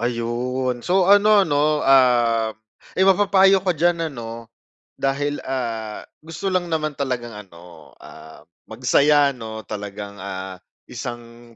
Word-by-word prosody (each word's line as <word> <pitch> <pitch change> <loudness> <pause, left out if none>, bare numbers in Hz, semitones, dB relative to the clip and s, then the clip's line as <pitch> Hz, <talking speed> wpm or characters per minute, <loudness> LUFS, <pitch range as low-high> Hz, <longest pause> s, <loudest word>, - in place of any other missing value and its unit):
ayun 120 +2 -2
so, 185 +8 +2
ano 205 +1 +5
'no, 150 -1 +1
ah, 120 -4 +4 0.5
eh, 190 - +3
mapapayo 195 0 +4
ka 180 -3 -1
diyan 170 +1 +1
ano 115 -2 -8 0.5
dahil, 145 +1 -1
ah, 115 -5 -4 0.2
gusto 165 +4 -6
lang 185 -1 0
naman 155 -1 -1
talagang 125 -4 -3
ano, 90 -5 -14
ah, 80 - -14 0.2
magsaya 140 +5 +3
'no, 110 -2 -8
talagang, 105 -1 -7
ah, 95 -1 -7 0.3
isang 120 -1 -9
125 Hz, 120 wpm, -21 LUFS, 115-160 Hz, 0.5 s, ano